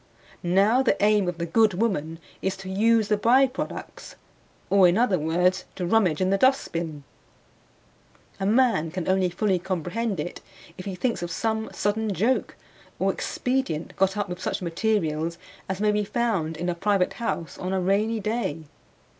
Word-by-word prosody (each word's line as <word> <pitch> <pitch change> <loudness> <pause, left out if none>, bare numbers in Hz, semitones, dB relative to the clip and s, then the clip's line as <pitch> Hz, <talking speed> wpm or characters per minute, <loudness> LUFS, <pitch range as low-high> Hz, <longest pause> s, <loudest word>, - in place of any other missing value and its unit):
Now 200 +8 +3
the 265 - +2
aim 210 -2 +4
of 175 -1 -2
the 170 - -2
good 210 +3 +3
woman 165 -7 -1 0.2
is 190 0 -1
to 190 0 -8
use 220 +2 +3
the 210 - +2
by 245 +6 +5
products, 260 0 -6 0.6
or, 195 -2 +6
in 175 +3 +2
other 225 -7 +2
words, 175 +4 +1
to 180 - -3
rummage 180 -5 +2
in 185 0 +1
the 195 - +2
dustbin. 170 - 0 1.4
A 195 - 0
man 225 -8 +3
can 180 +1 -5
only 190 -1 +2
fully 185 +1 0
comprehend 190 +3 -2
it 160 +4 -5 0.3
if 185 - -9
he 195 -2 -4
thinks 235 +3 -1
of 175 - -3
some 220 +5 -2
sudden 210 +1 -1
joke 240 +8 0 0.4
or - - +1
expedient 250 -12 -2
got 195 +1 +1
up 205 -1 -1
with 180 0 -6
such - - -2
materials 170 -3 -1 0.3
as 190 0 -2
may 210 0 +3
be 210 0 +1
found 195 -8 -1
in 175 +2 -3
a 175 - +1
private 195 +1 +1
house 170 -8 -3
on 185 - -3
a 190 - +1
rainy 205 +5 +1
day. 210 -7 -2
195 Hz, 170 wpm, -25 LUFS, 175-220 Hz, 1.4 s, or